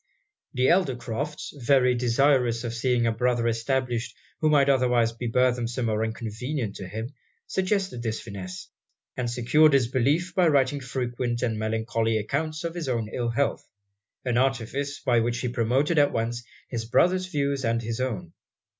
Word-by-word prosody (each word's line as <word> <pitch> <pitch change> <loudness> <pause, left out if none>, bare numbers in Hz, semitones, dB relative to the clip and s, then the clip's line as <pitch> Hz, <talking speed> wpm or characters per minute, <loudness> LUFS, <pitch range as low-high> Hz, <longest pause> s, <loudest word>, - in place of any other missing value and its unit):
The 125 +1 +3
elder 175 -8 +3
Crofts, 130 +5 -5
very 130 -1 +3
desirous 125 0 +2
of 120 -1 -3
seeing 120 0 +1
a 115 - +2
brother 120 +1 +1
established 120 +1 -1 0.2
who 155 - +2
might 145 -2 +4
otherwise 125 -4 +3
be 120 +1 -5
burthensome 120 0 +1
or 110 0 0
inconvenient 115 +1 -4
to 95 - -7
him, 110 +7 -6 0.3
suggested 190 - -1
this 110 -1 -2
finesse; 95 -4 -8 0.5
and 125 -2 -2
secured 140 +6 +4
it's 135 -3 +4
belief 140 +9 +1
by 180 -2 +3
writing 140 -2 +2
frequent 125 -2 -3
and 110 -3 -1
melancholy 110 +1 0
accounts 155 - -2
of 170 -1 -3
his 170 -5 -4
own 115 -4 -1
ill 120 -1 -1
health 125 +5 0 0.6
an 125 -1 +1
artifice 135 +2 -1
by 120 -6 +2
which 120 +1 0
he 125 - -1
promoted 130 +7 +1
at 145 - +4
once 120 +1 -2 0.2
his 115 -3 -4
brother's 185 +10 +2
views 140 -5 -1
and 115 0 0
his 115 +1 -3
own. 100 -10 -3
125 Hz, 165 wpm, -26 LUFS, 115-140 Hz, 0.6 s, might